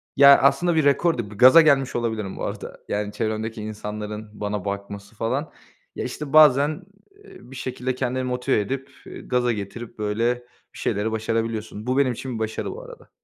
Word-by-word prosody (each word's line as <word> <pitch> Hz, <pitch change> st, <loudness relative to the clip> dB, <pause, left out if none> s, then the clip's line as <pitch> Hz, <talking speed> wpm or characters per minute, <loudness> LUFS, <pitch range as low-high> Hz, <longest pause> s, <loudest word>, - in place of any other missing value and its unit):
Ya, 140 Hz, 0 st, +9 dB
aslında 170 Hz, +5 st, +3 dB
bir 160 Hz, -, +3 dB
rekor 145 Hz, +3 st, +3 dB
değil, 115 Hz, -4 st, -4 dB
bir 105 Hz, -, -11 dB
gaza 130 Hz, +9 st, +9 dB
gelmiş 140 Hz, -4 st, +3 dB
olabilirim 110 Hz, -4 st, -2 dB
bu -, -, -5 dB
arada. -, -, -6 dB
Yani 105 Hz, 0 st, -2 dB
çevremdeki 110 Hz, 0 st, -3 dB
insanların 105 Hz, 0 st, -6 dB
bana 105 Hz, -2 st, -4 dB
bakması 100 Hz, +1 st, -6 dB
falan. 130 Hz, +8 st, -2 dB, 0.4 s
Ya -, -, -4 dB
işte 150 Hz, -2 st, -6 dB
bazen, 150 Hz, +2 st, +5 dB, 0.4 s
iii, 125 Hz, -, -15 dB
bir -, -, -10 dB
şekilde 130 Hz, 0 st, -3 dB
kendini 130 Hz, 0 st, -2 dB
motive 125 Hz, 0 st, 0 dB
edip, 135 Hz, +6 st, -4 dB, 0.2 s
eee, -, -, -9 dB
gaza 125 Hz, -1 st, 0 dB
getirip, 110 Hz, +2 st, -7 dB
böyle, 110 Hz, +3 st, 0 dB, 0.4 s
bir -, -, -13 dB
şeyleri 110 Hz, 0 st, -1 dB
başarabiliyorsun. 110 Hz, 0 st, -3 dB
Bu 130 Hz, +1 st, +1 dB
benim 140 Hz, -2 st, +3 dB
için 120 Hz, -1 st, -5 dB
başarı, 110 Hz, 0 st, -3 dB
bu 465 Hz, -, -8 dB
arada. -, -, -13 dB
120 Hz, 175 wpm, -23 LUFS, 105-135 Hz, 0.4 s, Ya